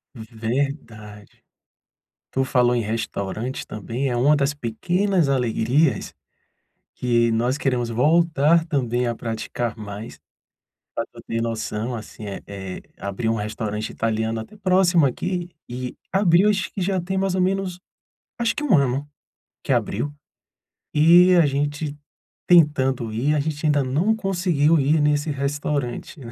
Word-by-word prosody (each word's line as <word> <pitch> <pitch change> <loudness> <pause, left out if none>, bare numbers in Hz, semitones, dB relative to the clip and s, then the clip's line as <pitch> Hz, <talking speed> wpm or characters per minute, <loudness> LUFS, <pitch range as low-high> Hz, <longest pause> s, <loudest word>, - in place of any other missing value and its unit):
Verdade. 110 -2 -5 0.9
Tu 135 - 0
falou 125 -1 +3
em 120 - +1
restaurantes 110 +2 -3
também, 115 +6 -4
é 120 - -1
uma 145 +5 +4
das 140 0 +1
pequenas 175 - 0
alegrias 130 +3 +1 0.8
que 120 -1 +2
nós 120 +4 +1
queremos 125 -5 0
voltar 160 +5 +3
também 125 -6 0
a 120 - -1
praticar 115 0 -4
mais, 105 0 -8 0.7
pra - - -2
tu - - -14
ter 115 0 -1
noção, 115 +1 -3
assim, 110 -1 -9
eh 100 - -6
eh, 95 -2 -7 0.2
abriu 100 +3 -2
um 115 - 0
restaurante 105 0 -3
italiano 110 0 -1
até 110 - -12
próximo 185 -4 +3
aqui 175 +7 -2 0.2
e 125 +1 -5 0.2
abriu 190 +1 +4
acho 190 -2 0
que 195 - -4
já 190 0 0
tem 190 +2 -3
mais 190 -1 0
ou 185 - +1
menos, 185 -1 -1 0.6
acho 235 -1 +1
que 300 - -3
1 230 - +4
ano, 140 +1 0 0.6
que - - -1
abriu, 145 - -1 0.8
e 175 +4 +7
a 170 - +5
gente 145 +1 -2 0.5
tentando 135 -9 +3
ir, 140 +7 +1
a - - +1
gente 150 +1 -3
ainda 145 -2 +3
não 160 +12 +1
conseguiu 175 -6 +2
ir 150 +3 +3
nesse 150 +1 +1
restaurante, 140 0 -3
né. 120 -4 -9
140 Hz, 140 wpm, -23 LUFS, 115-165 Hz, 0.9 s, e